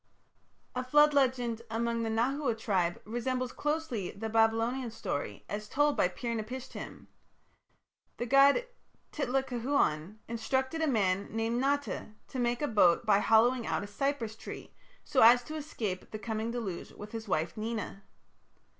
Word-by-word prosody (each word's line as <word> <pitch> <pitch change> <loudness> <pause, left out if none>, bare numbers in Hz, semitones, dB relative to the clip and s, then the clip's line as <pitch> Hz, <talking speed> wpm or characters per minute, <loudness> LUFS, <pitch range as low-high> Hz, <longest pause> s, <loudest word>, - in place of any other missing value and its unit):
A 250 - -1
flood 295 +3 +5
legend 250 -4 +1
among 230 +1 -1
the 225 - -1
Nahua 240 +2 0
tribes 185 -6 0
resembles 245 +3 -2
closely 295 - -2
the 220 +3 -5
Babylonian 225 +3 +2
story 145 - -4
as 210 +1 -5
told 290 +1 +2
by - - +3
Pir 235 +6 -4
napishtim. 240 +4 -6 1.1
The 240 - -2
god 275 - +5 0.5
Titlacahuan 245 - 0
instructed 260 +7 -1
a 320 - +2
man 200 -6 +1
named 225 +2 -1
Nata 280 -5 -1
to 260 - -5
make 240 +3 0
a - - +2
boat 195 -3 +4
by 205 -2 +5
hollowing 230 +3 +4
out - - -1
a - - -4
cypress 230 +1 -2
tree, - - -9 0.3
so 265 - +1
as 245 +2 +8
to 305 +6 -7
escape 225 -11 -4
the 215 - -5
coming 220 +1 -3
deluge 225 -7 -4
with 210 0 -10
his 225 -1 -6
wife 165 -3 -1
Nena. 215 -2 -4
235 Hz, 145 wpm, -31 LUFS, 215-260 Hz, 1.1 s, as